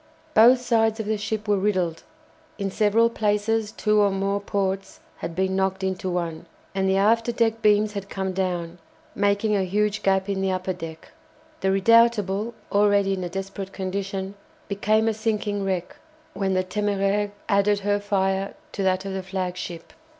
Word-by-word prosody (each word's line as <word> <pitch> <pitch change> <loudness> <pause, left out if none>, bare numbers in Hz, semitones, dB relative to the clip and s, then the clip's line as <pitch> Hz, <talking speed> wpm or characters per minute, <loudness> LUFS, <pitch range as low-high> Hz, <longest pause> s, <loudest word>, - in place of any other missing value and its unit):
Both 240 +4 +7
sides 225 -2 +2
of 220 - -2
the 215 +1 0
ship 210 +1 -3
were 205 -1 +2
riddled, 185 -5 0 0.6
in 200 -2 -2
several 215 +3 +3
places 215 -1 0
two 210 -1 +1
or 205 -1 +4
more 195 +1 -1
ports 195 -1 -2 0.2
had 165 - -6
been 190 +1 0
knocked 190 0 0
into 190 0 -2
one, 170 -3 -3 0.3
and 190 0 0
the 190 - +3
after 225 +4 +3
deck 225 -1 0
beams 210 0 +3
had 200 -1 -6
come 190 -1 -3
down, 180 -2 -2 0.3
making 205 +1 +1
a 195 - +1
huge 210 +3 0
gap 190 0 +2
in 195 -1 -1
the 195 - +1
upper 185 0 -1
deck. 165 -2 -9 0.5
The 190 - -1
"Redoutable," 215 +1 +3 0.2
already 200 -1 +3
in 185 -1 -3
a 175 - -3
desperate 195 +1 -6
condition, 195 0 -3 0.3
became 215 +2 +1
a 225 - +2
sinking 210 -2 -1
wreck 185 -2 -2 0.4
when 190 -1 -1
the 185 - +2
"Téméraire" 205 +1 0 0.2
added 200 0 +2
her 205 +1 +1
fire 195 -1 -1 0.2
to - - -4
that 190 0 +1
of 195 - -4
the 190 - -3
flagship. 180 -3 -5
195 Hz, 170 wpm, -24 LUFS, 190-210 Hz, 0.6 s, Both